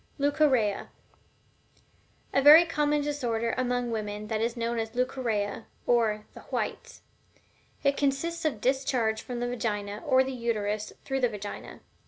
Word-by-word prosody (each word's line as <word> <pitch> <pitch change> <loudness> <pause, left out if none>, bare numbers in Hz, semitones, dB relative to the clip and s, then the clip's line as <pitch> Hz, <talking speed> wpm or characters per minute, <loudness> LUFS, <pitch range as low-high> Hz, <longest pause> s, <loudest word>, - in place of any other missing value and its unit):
LEUCORRHEA. 280 -8 +2 1.5
A 275 - +4
very 305 +5 +9
common 295 -2 +1
disorder 240 -6 -1
among 245 -1 -1
women 210 -1 -3
is 220 +2 -1
that - - -8
known 235 0 -1
as 225 +1 -4
Leucorrhea, 235 -5 -1 0.2
or 220 -3 +2
"the - - -11
whites." - - -4 0.8
It 280 0 +2
consists 310 +5 0
of 310 -3 +2
a - - -13
discharge 245 -2 0
from 245 -1 -5
the 245 - 0
Vagina, 210 -4 -3
or 260 0 +4
the 265 - -4
Uterus 215 -3 -2
through 270 0 -1
the 250 -2 +2
Vagina. 205 -2 -7
240 Hz, 145 wpm, -28 LUFS, 220-275 Hz, 1.5 s, very